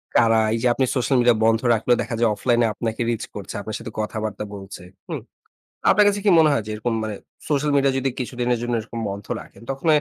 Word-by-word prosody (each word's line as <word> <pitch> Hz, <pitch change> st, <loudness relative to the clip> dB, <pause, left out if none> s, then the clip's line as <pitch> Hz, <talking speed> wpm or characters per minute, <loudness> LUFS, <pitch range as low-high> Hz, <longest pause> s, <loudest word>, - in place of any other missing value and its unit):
কারা 115 Hz, -1 st, +5 dB
এই -, -, +1 dB
যে, 125 Hz, -, +2 dB
আপনি 130 Hz, -, +1 dB
সোশ্যাল 130 Hz, +1 st, +1 dB
মিডিয়া 120 Hz, -2 st, +4 dB
বন্ধ 115 Hz, 0 st, +4 dB
রাখলেও 115 Hz, +2 st, +2 dB
দেখা 115 Hz, -, -3 dB
যায়, 115 Hz, -1 st, +4 dB
অফলাইনে 120 Hz, +2 st, +2 dB
আপনাকে 115 Hz, +2 st, -3 dB
রিচ 115 Hz, -, -1 dB
করছে, 100 Hz, -, -6 dB
আপনার 110 Hz, +1 st, -5 dB
সাথে -, -, -8 dB
কথাবার্তা 105 Hz, -1 st, -3 dB
বলছে। 95 Hz, -2 st, -9 dB, 0.3 s
হুম। -, -, -4 dB, 0.7 s
আপনার 210 Hz, -, +6 dB
কাছে 205 Hz, 0 st, +2 dB
কি -, -, +5 dB
মনে 155 Hz, -1 st, +6 dB
হয় 115 Hz, -, 0 dB
যে, 110 Hz, -, -5 dB
এরকম 115 Hz, +2 st, -2 dB
মানে 110 Hz, -2 st, -3 dB, 0.3 s
সোশ্যাল 145 Hz, 0 st, +1 dB
মিডিয়া 140 Hz, -1 st, +3 dB
যদি 135 Hz, 0 st, 0 dB
কিছুদিনের 125 Hz, -1 st, -1 dB
জন্য 120 Hz, 0 st, -2 dB
এরকম 115 Hz, +1 st, -7 dB
বন্ধ 100 Hz, 0 st, -6 dB, 0.2 s
রাখেন, -, -, -16 dB
তখন 135 Hz, +4 st, -5 dB
120 Hz, 215 wpm, -22 LUFS, 110-130 Hz, 0.7 s, আপনার